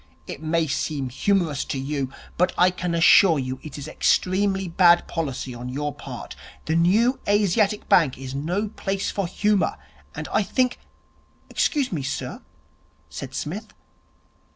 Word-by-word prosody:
'It -, -, -8 dB
may 160 Hz, +1 st, +1 dB
seem 140 Hz, -2 st, -2 dB
humorous 165 Hz, +1 st, 0 dB
to -, -, -4 dB
you, 135 Hz, -1 st, -3 dB, 0.2 s
but 180 Hz, -, +2 dB
I 180 Hz, +1 st, +5 dB
can 180 Hz, -1 st, -3 dB
assure 170 Hz, 0 st, +6 dB
you 130 Hz, -1 st, -3 dB
it 150 Hz, -2 st, -9 dB
is 140 Hz, -, -7 dB
extremely 190 Hz, 0 st, +1 dB
bad 175 Hz, 0 st, +4 dB
policy 135 Hz, -5 st, -3 dB
on 120 Hz, +1 st, -7 dB
your 145 Hz, +3 st, -3 dB
part. -, -, -8 dB, 0.3 s
The 160 Hz, -, 0 dB
New 215 Hz, +10 st, +3 dB
Asiatic 205 Hz, +1 st, +2 dB
Bank 155 Hz, -7 st, +4 dB
is 130 Hz, 0 st, -7 dB
no 175 Hz, +10 st, -2 dB
place 195 Hz, -2 st, -3 dB
for 200 Hz, -3 st, -2 dB
humour, 205 Hz, +2 st, +1 dB, 0.4 s
and -, -, -5 dB
I -, -, +4 dB
think 250 Hz, +5 st, 0 dB, 0.4 s
' -, -, -36 dB
'Excuse 280 Hz, -4 st, +1 dB
me, 160 Hz, -6 st, -2 dB
sir,' 135 Hz, 0 st, -4 dB, 0.7 s
said 135 Hz, -1 st, -7 dB
Psmith. 195 Hz, +11 st, -5 dB
170 Hz, 155 wpm, -24 LUFS, 140-200 Hz, 0.7 s, assure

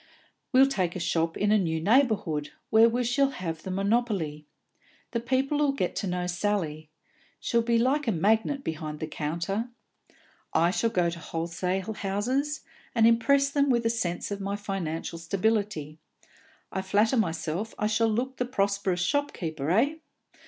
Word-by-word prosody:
"We'll 265 Hz, +1 st, +7 dB
take 185 Hz, -11 st, -1 dB
a -, -, -3 dB
shop 165 Hz, -1 st, 0 dB
in 205 Hz, 0 st, +2 dB
a 215 Hz, -, +5 dB
new 160 Hz, -4 st, 0 dB
neighbourhood, 200 Hz, -, +2 dB, 0.2 s
where 225 Hz, +1 st, +7 dB
we 245 Hz, +2 st, 0 dB
shall 270 Hz, +3 st, +2 dB
have 165 Hz, -10 st, -5 dB
the 190 Hz, -, -7 dB
monopoly. 195 Hz, -7 st, 0 dB, 0.6 s
The 235 Hz, -, 0 dB
people 265 Hz, +5 st, +1 dB
'll 280 Hz, -1 st, +2 dB
get 185 Hz, -10 st, -2 dB
to 200 Hz, -, -2 dB
know 180 Hz, 0 st, -1 dB
Sally; 175 Hz, -5 st, -2 dB, 0.5 s
she'll 235 Hz, -1 st, +1 dB
be 230 Hz, 0 st, +2 dB
like 265 Hz, +4 st, +1 dB
a -, -, +3 dB
magnet 220 Hz, -, +1 dB
behind 155 Hz, -1 st, -4 dB
the -, -, -2 dB
counter. 170 Hz, +9 st, -3 dB, 0.9 s
I 170 Hz, +2 st, +4 dB
shall 230 Hz, +4 st, +1 dB
go 180 Hz, -6 st, +1 dB
to 170 Hz, -, -7 dB
the -, -, -12 dB
wholesale 180 Hz, +5 st, -2 dB
houses, 250 Hz, +10 st, -1 dB, 0.3 s
and 225 Hz, -1 st, +5 dB
impress 275 Hz, +5 st, +4 dB
them 280 Hz, 0 st, +2 dB
with 235 Hz, -2 st, +2 dB
a 230 Hz, -, +3 dB
sense 185 Hz, -5 st, -2 dB
of 200 Hz, 0 st, -3 dB
my 200 Hz, +1 st, -2 dB
financial 175 Hz, -5 st, -4 dB
stability; 190 Hz, -4 st, -1 dB, 0.7 s
I 190 Hz, -, -2 dB
flatter 205 Hz, +6 st, +2 dB
myself 170 Hz, +1 st, -1 dB
I -, -, -1 dB
shall 220 Hz, +1 st, +2 dB
look 255 Hz, +4 st, -1 dB
the 250 Hz, -, 0 dB
prosperous 200 Hz, -6 st, 0 dB
shopkeeper, 175 Hz, -, -1 dB
eh? 245 Hz, -, +3 dB
200 Hz, 165 wpm, -27 LUFS, 170-235 Hz, 0.9 s, We'll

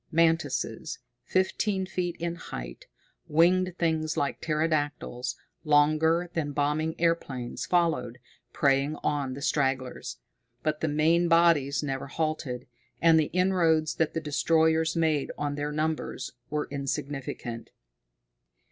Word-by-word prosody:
Mantises, 160 Hz, -8 st, +1 dB, 0.3 s
fifteen 190 Hz, +1 st, 0 dB
feet 180 Hz, -2 st, -2 dB
in 170 Hz, 0 st, -2 dB
height, -, -, -8 dB, 0.4 s
winged 180 Hz, +3 st, +3 dB
things 160 Hz, -2 st, 0 dB
like 140 Hz, -, -1 dB
pterodactyls, 150 Hz, -5 st, -1 dB, 0.3 s
longer 155 Hz, +3 st, +3 dB
than 145 Hz, -3 st, -2 dB
bombing 150 Hz, +2 st, 0 dB
airplanes, 140 Hz, -6 st, -1 dB
followed, 165 Hz, -9 st, +1 dB, 0.3 s
preying 140 Hz, +1 st, +2 dB
on 140 Hz, -3 st, -1 dB
the 140 Hz, -, -7 dB
stragglers. 130 Hz, -3 st, -1 dB, 0.5 s
But 155 Hz, 0 st, -1 dB
the 160 Hz, -, +1 dB
main 160 Hz, +3 st, +3 dB
bodies 165 Hz, -5 st, +4 dB
never 135 Hz, -1 st, -3 dB
halted, 155 Hz, -4 st, -3 dB, 0.3 s
and 165 Hz, -1 st, +6 dB
the 155 Hz, -, +3 dB
inroads 170 Hz, -3 st, +2 dB
that 160 Hz, 0 st, 0 dB
the 165 Hz, -, -1 dB
destroyers 160 Hz, +1 st, +2 dB
made 160 Hz, -4 st, +1 dB
on 145 Hz, -1 st, -2 dB
their 145 Hz, +1 st, -3 dB
numbers 155 Hz, -3 st, -2 dB, 0.2 s
were 150 Hz, 0 st, -2 dB
insignificant. 135 Hz, -4 st, -4 dB
155 Hz, 115 wpm, -28 LUFS, 145-165 Hz, 0.5 s, and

